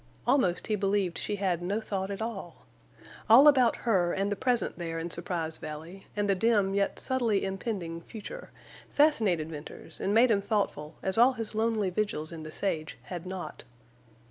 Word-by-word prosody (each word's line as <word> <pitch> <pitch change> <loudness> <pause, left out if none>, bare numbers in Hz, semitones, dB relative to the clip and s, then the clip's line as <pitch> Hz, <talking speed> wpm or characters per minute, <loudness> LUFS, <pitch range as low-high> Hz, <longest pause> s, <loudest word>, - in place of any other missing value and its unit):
Almost 240 -10 +2
he 215 - 0
believed 195 -3 0
she 210 - -2
had 185 -4 -1
no 195 +5 -1
thought 195 -3 -3
at 200 +2 -3
all. 195 -7 -7 0.6
All 255 +7 +9
about 260 -5 +5
her 185 -7 +2
and 195 +1 -1
the - - +1
present 245 -4 0
there 165 -1 -3
in 165 +1 -4
Surprise 165 -2 -1
Valley, 160 +5 -8
and 205 -1 0
the 200 - +4
dim 200 -1 +2
yet 200 0 0
subtly 235 -7 0
impending 190 -4 -4
future, 230 - -9 0.4
fascinated 210 - +2
Venters 150 -1 -8
and 195 - -1
made 230 +3 +5
him 200 -2 +3
thoughtful 195 -8 -2
as 190 +3 0
all 250 +3 +6
his 225 -3 -4
lonely 220 -3 0
vigils 175 -6 -2
in 165 -1 -7
the 155 0 -8
sage 155 -4 -2
had 180 -1 -7
not. 185 -1 -6
195 Hz, 175 wpm, -29 LUFS, 175-225 Hz, 0.6 s, All